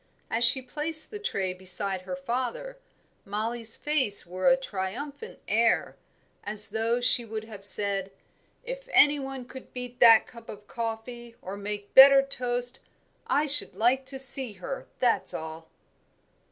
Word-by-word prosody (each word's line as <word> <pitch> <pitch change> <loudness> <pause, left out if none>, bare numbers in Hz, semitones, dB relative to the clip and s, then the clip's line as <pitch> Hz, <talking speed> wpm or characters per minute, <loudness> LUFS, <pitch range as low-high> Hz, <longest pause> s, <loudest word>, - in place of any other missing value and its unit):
As 230 +2 0
she 255 +2 +4
placed 305 +5 +1
the 420 - -7
tray 195 - -3
beside 185 +1 -1
her 190 +9 -7
father, 270 - -5 0.4
Mollie's 225 +2 -4
face 270 -9 -1
wore 185 +4 -3
a 265 0 +5
triumphant 265 - -7
air, - - 0 0.5
as 210 0 +1
though 230 +2 -1
she 245 0 +4
would 220 -1 -7
have 210 -3 -12
said, 200 -1 -1 0.5
"If - - -8
any 295 0 +6
one 270 -2 -7
could 260 +1 -13
beat 250 -1 -7
that 230 -2 +7
cup 235 -1 -16
of 210 0 -11
coffee 230 +1 -7
or 190 +2 -8
make 205 0 -7
better 270 0 +8
toast, 245 -2 +1 0.5
I 295 - +1
should 290 -9 +6
like 250 +6 +1
to 270 +1 -3
see 265 -3 0
her, - - -8
that's - - 0
all." 160 0 -9
240 Hz, 150 wpm, -26 LUFS, 205-270 Hz, 0.5 s, better